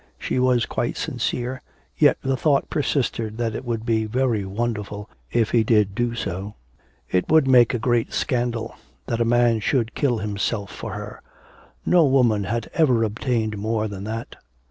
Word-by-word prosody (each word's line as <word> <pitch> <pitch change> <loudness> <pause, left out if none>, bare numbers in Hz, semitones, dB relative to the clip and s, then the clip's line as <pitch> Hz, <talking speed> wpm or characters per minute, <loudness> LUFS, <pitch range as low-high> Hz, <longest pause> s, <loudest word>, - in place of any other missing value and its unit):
She - - -2
was 125 -2 +3
quite - - -2
sincere, 125 +1 -3 0.3
yet - - +4
the 135 0 +1
thought 140 +1 +1
persisted 115 -7 -1
that 115 -2 -1
it 115 - -5
would 115 -2 -3
be 110 -2 +1
very 120 -2 0
wonderful 105 0 -3 0.2
if 115 -2 +1
he 115 -2 +4
did 105 -3 +2
do 120 +2 -1
so. 100 -1 -4 0.6
It 90 - +1
would 155 -3 +5
make 125 -2 +5
a - - +1
great 120 0 0
scandal. 120 -2 -1 0.3
That 115 0 -2
a - - +3
man 120 -1 +3
should 115 +1 0
kill 130 -5 +1
himself 105 0 -2
for - - -7
her! - - -7 0.6
No 175 -2 +5
woman 125 -7 +3
had 115 +3 -2
ever 130 -8 +3
obtained 110 -1 -1
more 110 +1 -1
than 100 -2 -7
that. 115 +2 -6
115 Hz, 165 wpm, -23 LUFS, 110-125 Hz, 0.6 s, would